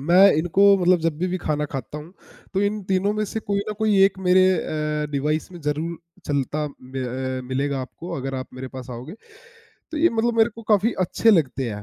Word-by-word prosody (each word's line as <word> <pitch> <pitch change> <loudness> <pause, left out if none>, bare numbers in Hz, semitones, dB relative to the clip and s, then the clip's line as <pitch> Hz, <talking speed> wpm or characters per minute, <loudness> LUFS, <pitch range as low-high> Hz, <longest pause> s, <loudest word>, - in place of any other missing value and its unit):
मैं 180 +7 +6
इनको 195 +5 +4
मतलब 180 -1 +3
जब 160 -2 -1
भी 185 - -1
खाना 150 -2 -1
खाता 135 +2 -5
हूँ, 160 +4 -11 0.4
तो 195 - +2
इन 205 0 -1
तीनों 195 +2 +2
में 215 0 -1
से 220 - -4
कोई 200 -1 0
ना - - -1
कोई 215 -2 +2
एक 195 0 +1
मेरे 185 0 +4
अ, 150 -2 -2
डिवाइस 150 +4 -1
में 175 - -10
ज़रूर 155 +3 -2 0.3
चलता 145 +1 -1
मे 130 +1 -6 0.4
अ, - - -6
मिलेगा 135 +1 -1
आपको 145 +6 -8
अगर 135 0 -4
आप 130 0 -5
मेरे 130 +1 -6
पास 130 -1 -8
आओगे, 125 +7 -7 0.8
तो 310 - -2
ये 340 - +5
मतलब 230 +1 0
मेरे 225 +1 +5
को 230 - -10
काफ़ी 210 +3 +3
अच्छे 205 +5 +3
लगते 135 - +1
हैं। 105 0 -6
165 Hz, 210 wpm, -23 LUFS, 140-200 Hz, 0.8 s, मैं